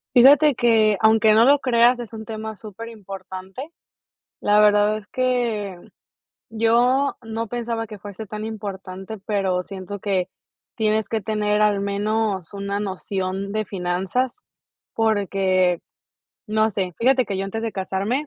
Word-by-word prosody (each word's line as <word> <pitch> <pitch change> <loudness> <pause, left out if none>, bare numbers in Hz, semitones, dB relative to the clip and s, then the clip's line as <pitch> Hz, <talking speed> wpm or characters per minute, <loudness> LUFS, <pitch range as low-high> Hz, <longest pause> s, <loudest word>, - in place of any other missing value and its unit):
Fíjate 280 +3 +7
que, 220 -4 +3
aunque 220 0 +5
no 225 +2 +6
lo 285 +1 +5
creas, 240 -1 +4
es 235 -2 -7
un 220 -1 -8
tema 220 -1 -6
superimportante. 205 - -9 0.7
La 205 0 +3
verdad 210 0 +4
es 210 - -11
que 235 -7 -1 0.7
yo 240 +5 +2
no 225 0 -4
pensaba 230 -1 -3
que 210 -1 -10
fuese 205 +2 -8
tan 215 +2 -6
importante, 200 -1 -6
pero 195 -4 0
siento 195 +1 -7
que, 190 -2 -1 0.5
tienes 215 -2 +1
que 225 0 -1
tener 210 0 0
al 210 -1 +3
menos 200 -2 -1
una 200 0 -3
noción 195 -1 -3
de 215 0 -1
finanzas, 190 +7 -2 0.6
porque 195 -5 +1 0.7
no 220 0 +2
sé, 185 -3 -3
fíjate 255 +1 +3
que 195 - -3
yo 195 - -2
antes 195 +3 -4
de 225 - -3
casarme, 195 +9 -2
215 Hz, 140 wpm, -22 LUFS, 195-225 Hz, 0.7 s, Fíjate